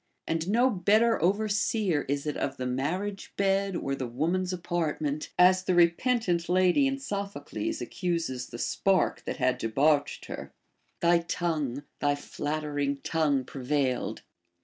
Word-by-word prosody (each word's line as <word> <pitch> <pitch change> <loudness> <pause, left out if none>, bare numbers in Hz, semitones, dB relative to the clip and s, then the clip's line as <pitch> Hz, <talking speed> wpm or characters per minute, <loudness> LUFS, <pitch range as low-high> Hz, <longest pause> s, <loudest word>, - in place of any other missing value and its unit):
And 165 +2 -1
no 245 +5 +4
better 215 +3 +3
overseer 200 -2 +1
is 140 +1 -1
it 150 - -2
of 140 0 -2
the 130 - -3
marriage 175 +11 -3
bed 195 -1 +1
or 140 -4 -2
the 130 -2 -3
woman's 170 +9 -1
apartment; 165 -4 -2
as 185 +1 +5
the 185 - +2
repentant 175 0 +2
lady 185 +9 +4
in 270 0 -1
Sophocles 245 +7 -4
accuses 165 -9 -2
the 120 - -8
spark 185 +8 +1
that - - -3
had 130 0 +1
debauched 140 +6 +1
her, - - -8 0.2
— - - -44
Thy 170 0 +5
tongue, 155 -6 -2 0.2
tliy 145 0 +2
flattering 145 -1 -2
tongue 150 -5 +1
prevailed. 130 0 -2
170 Hz, 140 wpm, -28 LUFS, 145-195 Hz, 0.2 s, as